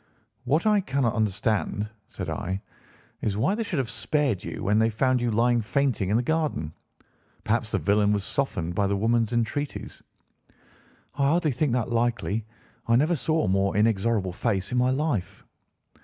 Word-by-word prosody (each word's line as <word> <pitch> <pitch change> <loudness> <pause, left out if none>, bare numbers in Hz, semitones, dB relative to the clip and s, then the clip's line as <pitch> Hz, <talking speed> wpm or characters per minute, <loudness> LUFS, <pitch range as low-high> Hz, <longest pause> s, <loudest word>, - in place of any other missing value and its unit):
"What 150 - +1
I 210 -2 +4
cannot 135 - 0
understand," 105 0 0 0.2
said - - -6
I, 95 +2 -3 0.6
"is 100 -2 -1
why 135 - +2
they 225 - -2
should 195 -7 -2
have 130 -3 0
spared 110 - 0
you - - -6
when 105 +2 +3
they 110 0 +3
found 130 +3 +1
you 120 - +1
lying 120 +2 +2
fainting 115 -4 0
in 105 - +3
the 120 - +1
garden. 150 - -1 0.7
Perhaps 115 0 0
the - - 0
villain 105 0 +2
was 100 -2 0
softened 90 -10 -2
by 100 +2 +1
the 100 0 0
woman's 115 +1 +1
entreaties." 120 +5 -3 1.1
"I 140 -1 +1
hardly 160 0 +2
think 130 0 0
that 120 -2 -1
likely. 115 -2 0 0.4
I 115 - +4
never 155 +8 +3
saw 160 +2 0
a - - 0
more 95 +1 +1
inexorable 105 -3 +1
face 95 -2 -1
in 125 - +1
my 125 +1 +3
life." 130 - -2
115 Hz, 170 wpm, -26 LUFS, 105-135 Hz, 1.1 s, I